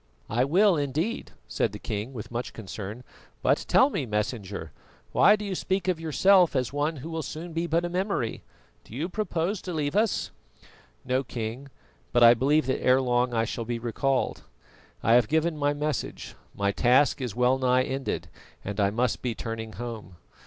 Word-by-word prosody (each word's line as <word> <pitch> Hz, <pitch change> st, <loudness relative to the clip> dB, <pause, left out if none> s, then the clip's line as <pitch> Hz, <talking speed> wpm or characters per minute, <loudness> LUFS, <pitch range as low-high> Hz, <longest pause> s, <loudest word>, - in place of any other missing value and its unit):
"I 120 Hz, +3 st, +2 dB
will 185 Hz, +5 st, +4 dB
indeed," 150 Hz, -, -2 dB, 0.2 s
said 110 Hz, -, -1 dB
the -, -, -5 dB
king, 105 Hz, +2 st, -4 dB
with 120 Hz, -4 st, -8 dB
much 120 Hz, +1 st, -4 dB
concern. 105 Hz, +2 st, -7 dB, 0.4 s
"But -, -, +2 dB
tell 270 Hz, +2 st, +5 dB
me, 140 Hz, -, -2 dB
Messenger, 105 Hz, -1 st, -3 dB, 0.4 s
why 210 Hz, -, +6 dB
do 210 Hz, 0 st, -6 dB
you 200 Hz, -, -3 dB
speak 190 Hz, 0 st, -1 dB
of 180 Hz, -3 st, +1 dB
yourself 175 Hz, +2 st, +4 dB
as 130 Hz, -2 st, +1 dB
of -, -, -19 dB
one 150 Hz, +3 st, 0 dB
who 160 Hz, +4 st, -5 dB
soon 155 Hz, +4 st, -6 dB
will -, -, -11 dB
be 165 Hz, +1 st, -1 dB
but 170 Hz, +1 st, +1 dB
a -, -, 0 dB
memory? 180 Hz, -, -2 dB, 0.4 s
Do 110 Hz, -, -12 dB
you 155 Hz, +6 st, -2 dB
purpose 190 Hz, -1 st, -2 dB
to 180 Hz, -, -5 dB
leave 145 Hz, -1 st, -1 dB
us?" 215 Hz, 0 st, +1 dB, 0.7 s
"No, 130 Hz, +1 st, +1 dB
King, 120 Hz, +2 st, -5 dB, 0.4 s
but 120 Hz, -1 st, +5 dB
I 115 Hz, 0 st, +10 dB
believe 140 Hz, +6 st, +2 dB
that 130 Hz, -, -1 dB
ere 130 Hz, +1 st, +5 dB
long 125 Hz, -1 st, +1 dB
I 115 Hz, 0 st, +2 dB
shall 115 Hz, -, -4 dB
be 120 Hz, +1 st, -3 dB
recalled. 130 Hz, +3 st, -1 dB, 0.6 s
I 115 Hz, -, +4 dB
have 120 Hz, -2 st, +5 dB
given 160 Hz, +3 st, +1 dB
my 145 Hz, -1 st, +1 dB
message, 150 Hz, -1 st, -3 dB, 0.2 s
my 100 Hz, 0 st, +1 dB
task 130 Hz, +6 st, +3 dB
is 125 Hz, -6 st, -4 dB
well 125 Hz, +2 st, +3 dB
nigh 130 Hz, 0 st, +3 dB
ended 135 Hz, +1 st, -3 dB, 0.4 s
and 100 Hz, +1 st, -4 dB
I 100 Hz, -1 st, +3 dB
must 120 Hz, +1 st, 0 dB
be 120 Hz, -3 st, -2 dB
turning 110 Hz, -1 st, -5 dB
home. 115 Hz, -6 st, -7 dB
130 Hz, 190 wpm, -27 LUFS, 115-160 Hz, 0.7 s, I